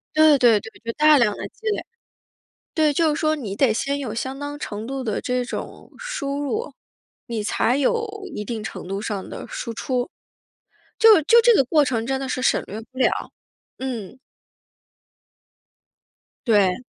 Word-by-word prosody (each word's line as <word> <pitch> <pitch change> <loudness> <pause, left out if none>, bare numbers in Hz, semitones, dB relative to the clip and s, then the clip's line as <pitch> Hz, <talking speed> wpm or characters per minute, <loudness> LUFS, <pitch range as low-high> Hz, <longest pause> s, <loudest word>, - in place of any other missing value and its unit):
对 310 -2 +6
对 235 -5 +5
对， 225 - -10 0.2
就 230 - -1
大 305 +1 +6
量 210 -5 +3
地 - - -6
积 445 - -10
累。 415 - -1 0.9
对， 310 -3 +3
就 310 0 +2
是 - - -3
说 310 0 +2
你 220 -9 -5
得 255 -3 +3
先 280 +5 -1
有 250 -6 -4
相 260 +3 -4
当 290 0 -5
程 215 -5 -5
度 270 +1 -4
的 215 -4 -2
这 250 -2 -1
种 - - -7
输 290 - -4
入， 435 - -3 0.5
你 230 -3 -3
才 240 +4 +1
有 455 - +1 0.3
一 210 - -4
定 220 0 -4
程 220 - -7
度 195 +1 -3
上 205 -3 -4
的 - - -7
输 230 - -5
出。 250 +5 -2 0.9
就 440 -7 +8
就 470 +8 +6
这 475 0 +6
个 275 - +5
过 295 +4 +3
程 230 -3 -1
真 265 +1 -1
的 270 - -4
是 255 - -2
省 - - +2
略 210 +3 -6
不 260 - -17
了。 260 - +4 0.7
嗯。 250 -3 -5 2.3
对。 205 -1 +3
260 Hz, 185 characters per minute, -23 LUFS, 225-300 Hz, 2.3 s, 就